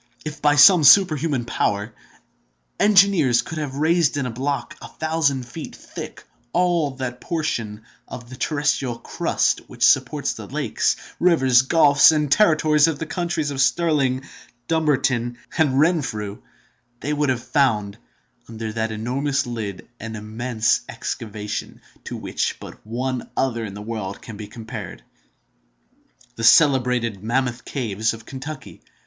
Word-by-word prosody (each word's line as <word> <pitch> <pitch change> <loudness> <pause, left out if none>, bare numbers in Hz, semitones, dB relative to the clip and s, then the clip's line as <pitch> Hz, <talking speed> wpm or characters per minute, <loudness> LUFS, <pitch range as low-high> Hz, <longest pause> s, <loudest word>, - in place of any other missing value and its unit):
If, 155 -1 -6
by 150 0 +4
some 165 +3 +8
superhuman 150 -5 +5
power, 105 -1 -1 0.9
engineers 190 - +4
could 160 - -6
have 145 -3 -4
raised 160 +1 +2
in 140 - -1
a 125 - -3
block, 130 +1 -3
a - - -8
thousand 155 -5 -1
feet 155 +5 -8
thick, - - -9 0.3
all 170 -6 +1
that 125 -2 -5
portion 115 - -3 0.2
of 120 -1 -9
the 130 - -10
terrestrial 135 -4 -1
crust - - -1
which - - +1
supports - - +2
the - - -9
lakes, - - 0 0.2
rivers, 135 -9 +4
gulfs, 145 +1 +5
and 150 -3 0
territories 155 -5 +4
of 160 -3 -1
the 165 - -4
counties 170 -3 -2
of 135 -1 -1
Stirling, 135 -4 +1 0.4
Dumbarton, 130 -7 0 0.2
and 145 -5 +2
Renfrew, 135 - 0 0.6
they 150 - -2
would 150 -1 0
have 125 -2 -1
found, 110 -8 0 0.5
under 110 -1 -6
that 110 0 -2
enormous 135 +6 -1
lid, 110 -6 -6
an 110 0 -6
immense 110 +2 -1
excavation, 105 -1 -5 0.3
to - - -5
which - - -3
but - - -12
one 125 +2 -3
other 120 -4 0
in 100 -2 -7
the 105 - -8
world 105 -3 -5
can 115 - -10
be 105 0 -8
compared—the 110 -4 -9 1.4
celebrated 125 - +4
Mammoth 125 +1 -1
caves 110 -4 -2
of 115 0 -14
Kentucky. 135 0 -8
130 Hz, 135 wpm, -22 LUFS, 115-150 Hz, 1.4 s, some